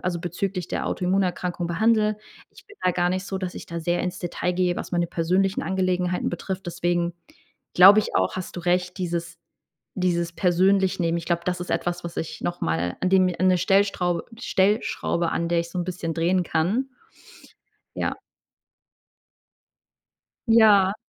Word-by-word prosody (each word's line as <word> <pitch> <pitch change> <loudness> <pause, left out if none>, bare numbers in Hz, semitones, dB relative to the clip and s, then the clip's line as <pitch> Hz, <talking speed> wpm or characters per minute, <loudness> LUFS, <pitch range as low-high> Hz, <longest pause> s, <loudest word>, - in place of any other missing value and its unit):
also, 175 -1 -1
bezüglich 180 +1 -3
der - - -3
Autoimmunerkrankung 180 -1 -1
behandle. 215 +4 +2 0.3
Ich - - -18
bin 410 - -16
da 185 - +3
gar 175 0 +1
nicht 185 +1 -2
so, 195 - -3
dass 185 -2 -4
ich - - -8
da 170 - -5
sehr 175 +1 0
ins 180 0 -3
Detail 180 0 -2
gehe, 180 0 +1
was - - -6
meine 175 -1 +1
persönlichen 185 +4 0
Angelegenheiten 180 -1 0
betrifft. 190 +2 -5
Deswegen 175 0 -1 0.6
glaube 195 +3 +9
ich 210 - -3
auch, - - +1
hast 185 0 -6
du - - -4
recht, 180 +1 0
dieses 170 -2 -3 0.6
dieses 170 -2 0
persönlich 190 +2 +2
Nehmen, 170 -1 +1
ich 170 - -6
glaube, 170 0 0
das 180 -1 -1
ist 180 - -5
etwas, 175 0 -2
was 170 0 -7
ich 160 - -5
nochmal 90 - -2
an 185 - +1
dem 190 0 +5
mir 180 -1 -1
'ne 185 -1 +4
Stellstraub 185 -1 +1 0.2
Stellschraube, 190 -5 0
an 170 0 -1
der 170 0 +2
ich 170 - -9
so 180 - -3
'n - - -1
bisschen 175 -2 -4
drehen 175 +3 +1
kann. 180 +12 0 1.1
Ja. - - -1 2.3
Ja. 210 -4 +6
180 Hz, 165 wpm, -24 LUFS, 170-190 Hz, 2.3 s, glaube